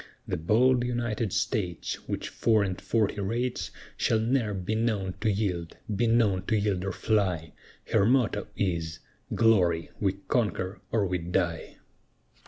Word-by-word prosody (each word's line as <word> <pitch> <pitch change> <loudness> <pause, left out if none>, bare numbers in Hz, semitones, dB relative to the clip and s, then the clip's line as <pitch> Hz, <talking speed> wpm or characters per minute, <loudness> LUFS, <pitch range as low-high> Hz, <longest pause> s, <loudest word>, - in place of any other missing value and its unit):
The - - -1
bold 120 +9 +3
United 120 -3 -1
States, 90 -5 -2
Which - - -3
four 110 -3 +2
and 95 -2 -3
forty 105 -2 0
rates, 120 +5 -1 0.3
Shall 110 - +2
ne'er 110 -2 +1
be 95 +3 -2
known 110 -5 0
to 110 - +2
yield 90 -5 -2 0.2
be 115 +4 +2
known 110 -5 +3
to 110 - +2
yield 100 -3 0
or 95 - -1
fly, 90 -7 0 0.4
Her 100 - +4
motto 120 -5 +2
is 85 -5 -1 0.4
"Glory! 90 -8 +3
we 95 -2 +2
conquer 95 -5 0
or 105 -3 +2
we 90 -1 -1
die." 85 -1 -2
105 Hz, 145 wpm, -28 LUFS, 90-115 Hz, 0.4 s, Her